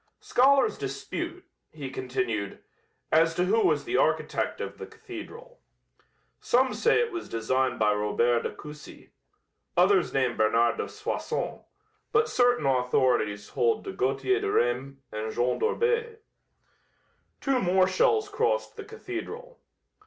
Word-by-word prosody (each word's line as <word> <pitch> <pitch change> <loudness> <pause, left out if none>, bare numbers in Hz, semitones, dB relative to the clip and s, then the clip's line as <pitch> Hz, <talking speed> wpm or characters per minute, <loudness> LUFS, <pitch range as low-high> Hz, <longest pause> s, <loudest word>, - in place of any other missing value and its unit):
"Scholars 275 - +3
dispute," 345 +2 -5 0.2
he 140 -4 -7
continued, 125 -6 -3 0.5
"as 165 +1 +4
to 180 - +1
who 215 +5 +2
was - - +2
the - - 0
architect - - 0
of - - -6
the - - -7
cathedral. 455 +6 -11 0.8
Some 255 +1 +2
say 470 - +3
it 465 0 0
was 345 -1 -6
designed 125 +2 0
by 105 -1 +3
Robert 115 +3 +1
de - - -2
Coucy; 150 -1 -12 0.7
others 185 +1 +4
name 130 -3 +1
Bernard 115 +2 +2
de - - -3
Soissons, 430 +3 -4 0.5
but 445 0 +3
certain 245 - +2
authorities 125 -5 +1
hold 455 -1 +1
to 390 - -5
Gauthier 385 +1 0
de 410 0 -2
Reims 130 +3 0
and 110 +1 -4
Jean 120 +2 0
d'Orbais." 465 0 0 1.2
Two 270 -2 +1
more 185 0 +3
shells 425 - +2
crossed 460 +4 -1
the 425 - -6
cathedral. 445 +4 -8
190 Hz, 130 wpm, -27 LUFS, -, 1.2 s, as